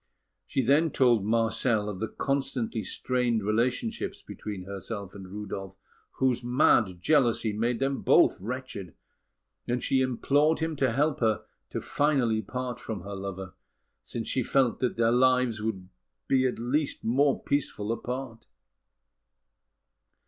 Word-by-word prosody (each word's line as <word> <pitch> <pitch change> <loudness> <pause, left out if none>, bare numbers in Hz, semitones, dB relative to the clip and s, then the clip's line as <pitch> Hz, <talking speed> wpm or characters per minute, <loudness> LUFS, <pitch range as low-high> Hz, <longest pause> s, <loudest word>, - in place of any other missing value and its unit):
She 135 - 0
then 145 +7 +4
told 120 -7 +3
Marcel 115 0 +1
of 100 -3 -5
the 110 - -1
constantly 130 -5 -2
strained 120 +1 0
relations 125 - 0 0.2
between 100 -3 -7
herself 100 +1 -6
and 95 -2 -9
Rudolf, 95 -1 -6 0.4
whose 125 -2 +1
mad 120 -7 +3
jealousy 120 - +2
made 115 +3 0
them 135 +2 -1
both - - +4
wretched; 110 - -6 0.7
and 120 0 -1
she 130 - +2
implored 140 +5 +2
him 160 -1 -2
to 130 -3 +2
help 145 +4 +1
her 110 -2 +1 0.3
to - - -5
part - - -11
finally 130 -7 +2
from 125 -2 -5
her 100 +2 -7
lover, 95 -1 -6 0.5
since 115 -1 -5
she 130 - 0
felt 125 0 +2
that 125 -2 -1
their 115 0 +3
lives 125 -2 +3
would 100 -4 -3 0.4
be 130 -1 +3
at 125 - -3
least 135 +5 -1
more 135 +5 +2
peaceful 115 -7 -1
apart. 125 0 -5
120 Hz, 135 wpm, -28 LUFS, 105-130 Hz, 0.7 s, then